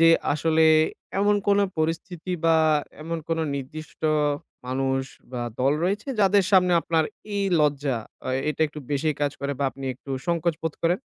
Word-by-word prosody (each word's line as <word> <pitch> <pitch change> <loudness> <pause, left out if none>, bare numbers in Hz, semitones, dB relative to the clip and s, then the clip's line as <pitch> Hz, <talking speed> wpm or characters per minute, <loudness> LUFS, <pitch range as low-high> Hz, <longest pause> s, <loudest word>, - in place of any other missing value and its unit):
যে, 165 - +7 0.2
আসলে 160 +2 +3 0.5
এমন 205 +1 +3
কোন 200 0 +5 0.2
পরিস্থিতি 165 +2 -2
বা 165 -1 +5 0.5
এমন 165 +1 -3
কোন 165 - 0 0.2
নির্দিষ্ট 155 +4 -8 0.7
মানুষ 135 +1 0 0.3
বা 125 - -3 0.2
দল 135 +2 +3
রয়েছে 205 +8 -1
যাদের 200 0 +4
সামনে 180 -1 +5
আপনার 160 0 +1 0.3
এই 200 - +1 0.2
লজ্জা 145 -3 +1 0.3
আ - - -2 0.2
এটা 150 - -7
একটু 150 0 -9
বেশি 145 +2 +1
কাজ 145 -1 +1
করে 140 0 -1
বা 140 - 0
আপনি 135 0 -9
একটু 135 +2 -12 0.2
সংকোচ 170 -1 +1
বোধ 160 -2 -2
করেন? 170 +2 +2
160 Hz, 160 wpm, -25 LUFS, 140-175 Hz, 0.7 s, যে